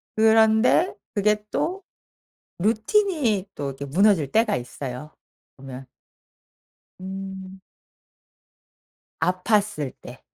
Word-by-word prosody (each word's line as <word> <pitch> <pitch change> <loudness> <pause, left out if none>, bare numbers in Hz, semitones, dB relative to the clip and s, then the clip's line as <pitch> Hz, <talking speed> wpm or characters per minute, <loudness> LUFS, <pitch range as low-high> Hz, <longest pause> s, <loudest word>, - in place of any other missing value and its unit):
그런데 220 +8 +4 0.2
그게 210 +1 +1
또 380 +3 -2 0.8
루틴이 225 - +1
또 140 - -4
이렇게 135 +1 -6
무너질 170 -1 +3
때가 225 +7 +2
있어요 125 +3 -7 0.4
보면. 130 -1 -10 1.1
음. 190 0 -7 1.6
아팠을 185 - 0
때. - - -12
195 Hz, 160 characters per minute, -24 LUFS, 150-220 Hz, 1.6 s, 그런데